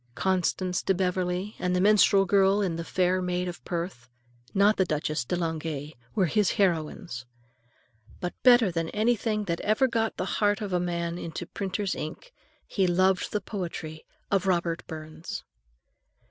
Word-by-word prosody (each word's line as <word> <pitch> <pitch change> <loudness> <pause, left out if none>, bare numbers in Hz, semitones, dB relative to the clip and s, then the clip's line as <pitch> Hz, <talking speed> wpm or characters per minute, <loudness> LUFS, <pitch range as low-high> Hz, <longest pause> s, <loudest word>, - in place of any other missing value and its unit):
Constance 185 0 0
de 190 - +1
Beverley 180 +2 -1
and 180 0 0
the - - +2
minstrel 200 0 +5
girl 195 +1 +4
in 185 -5 0
"The 165 - -4
Fair 185 +1 +1
Maid 180 0 -1
of 175 0 -7
Perth," 170 -9 -4 0.4
not 205 +2 +4
the 190 - +4
Duchesse 155 -4 -1
de 180 - -1
Langeais, 160 -3 -3 0.2
were 195 - +3
his 205 +3 +2
heroines. 165 - -1 0.9
But 180 - -3
better 240 -6 +6
than 165 -1 -2
anything 215 -1 +1
that 170 -4 -2
ever 215 +6 +3
got 225 -2 0
from - - -1
the - - -4
heart 205 -1 +3
of 205 -3 -4
a 180 - +3
man 170 -1 -2
into 170 +1 -5
printer's 195 +2 -2
ink, - - -7 0.3
he 190 -2 +1
loved 185 +2 +2
the 210 - -1
poetry 170 -5 -5 0.3
of 195 -1 +2
Robert 170 -2 +1
Burns. 155 +1 -7
180 Hz, 160 wpm, -27 LUFS, 170-200 Hz, 0.9 s, better